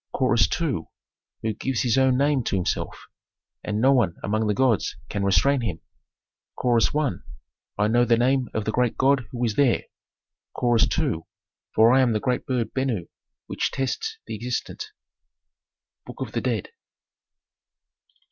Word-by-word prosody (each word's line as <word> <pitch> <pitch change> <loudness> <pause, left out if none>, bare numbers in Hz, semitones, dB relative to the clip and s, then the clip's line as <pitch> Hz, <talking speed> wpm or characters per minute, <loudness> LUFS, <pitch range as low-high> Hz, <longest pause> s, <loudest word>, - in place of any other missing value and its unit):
Chorus 125 -3 +3
II. 140 - -2 0.6
"Who 110 -1 0
gives 130 +3 -2
his 120 -2 +2
own 130 -1 +3
name 140 -1 +2
to - - 0
himself, 90 -2 -2 0.6
and 105 0 -2
no 135 +4 +5
one 110 -10 +2
among 110 +2 0
the 105 - +1
gods 125 -4 +1
can 100 - -2
restrain 100 +8 +3
him." 90 -8 -3 0.8
Chorus 120 -3 +2
I. 150 -2 +2 0.7
"I 105 +1 +2
know 120 +2 +3
the 120 -1 +3
name 130 +1 +2
of 110 -1 -1
the 110 - 0
great 125 0 0
god 135 -3 +2
who 125 -2 -4
is 110 - 0
there." 135 -5 +3 0.7
Chorus 120 -2 +3
II. 140 - 0 0.6
"For 115 +2 +6
I 135 - +5
am 125 -3 +2
the 110 - +1
great 125 +4 -1
bird 125 -4 -1
Benu 125 -10 -2 0.4
which - - -2
tests 440 - -3
the - - -6
existent." 120 - -4 1.2
"Book - - -10
of - - -4
the - - -2
Dead." - - -2
120 Hz, 155 wpm, -24 LUFS, 110-130 Hz, 1.2 s, For